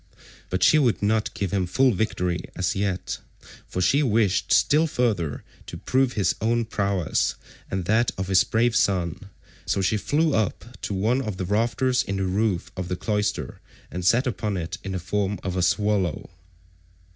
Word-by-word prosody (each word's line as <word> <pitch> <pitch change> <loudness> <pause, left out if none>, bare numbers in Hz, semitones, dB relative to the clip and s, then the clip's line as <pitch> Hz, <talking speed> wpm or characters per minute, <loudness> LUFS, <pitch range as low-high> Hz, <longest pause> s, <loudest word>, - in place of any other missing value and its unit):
But 95 - 0
she 155 - +6
would 120 -7 +1
not 110 +1 +1
give 100 -3 -2
him 95 -3 0
full 130 +8 +3
victory 90 -4 -1
as 90 -1 -1
yet, 95 -1 -2 0.5
for 90 - -3
she 140 +10 +3
wished 110 -7 +1
still 155 +3 +4
further 105 - -1 0.2
to - - -7
prove 130 -1 +1
his 100 -3 +1
own 115 +1 +1
prowess 100 -5 0 0.3
and 95 -2 -2
that 110 +5 +3
of 95 0 -3
his 95 -1 +5
brave 115 +1 +1
son, 90 0 0 0.4
so - - +1
she 95 +3 +1
flew 150 +8 +1
up 110 -1 0 0.2
to 100 - -3
one 115 +7 +1
of 110 -7 -4
the 95 - -3
rafters 120 +6 +1
in 100 - -3
the 95 - -1
roof 95 -1 0
of 90 -1 -4
the 90 - -2
cloister 105 - -2 0.3
and 90 - -4
sat 120 +9 +3
upon 105 -4 -2
it 85 -1 -5
in 95 - -4
the 95 - -2
form 100 +3 -1
of 90 -1 -3
a 90 - 0
swallow. 95 -2 0
100 Hz, 180 wpm, -24 LUFS, 95-115 Hz, 0.5 s, she